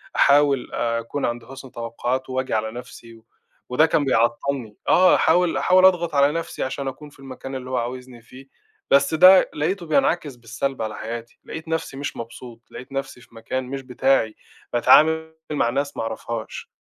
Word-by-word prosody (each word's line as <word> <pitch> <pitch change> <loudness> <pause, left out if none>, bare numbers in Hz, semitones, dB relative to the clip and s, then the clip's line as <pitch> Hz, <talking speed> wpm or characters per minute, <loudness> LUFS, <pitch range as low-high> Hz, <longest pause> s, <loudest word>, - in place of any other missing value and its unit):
أحاول 140 -2 +3
أكون 115 +4 -2
عند 120 0 -3
حُسن 130 0 -11
توقعاته 120 +3 -4
وآجي 130 0 -2
على 110 0 -1
نَفسي 120 -1 -11
و 115 0 -20 0.4
وده 140 +6 +4
كان 150 -3 +1
بيعطّلني، 120 -1 0
آه، 185 +1 +6
هاحاول 180 -2 +3
هاحاول 185 0 +4
أضغط 170 -4 +3
على 140 +1 +4
نَفسي 165 +1 -4
عشان 135 +1 -4
أكون 145 +3 -7
في 140 - -22
المكان 135 0 -8
اللي 130 0 -7
هو 130 - -1
عاوزني 125 0 -5
فيه، 130 +4 -15 0.4
بس 140 +2 +4
ده 185 +4 +7
لقيته 170 +4 -2
بينعكس 145 -1 0
بالسلب 120 +2 -4
على 110 -1 -3
حياتي، 115 +2 -7
لقيت 160 +1 -8
نَفسي 160 -4 -3
مش 140 +1 -5
مبسوط، 115 0 -9
لقيت 130 - -10
نَفسي 135 -2 -5
في 115 -1 -20
مكان 130 +3 -4
مش 135 +2 -6
بتاعي، 130 -3 +1 0.4
باتعامل 160 +6 +4 0.2
مع 145 -6 +1
ناس 140 +3 -3
ما - - -2
أعرفهاش. 115 0 -6
130 Hz, 170 wpm, -22 LUFS, 120-145 Hz, 0.4 s, ده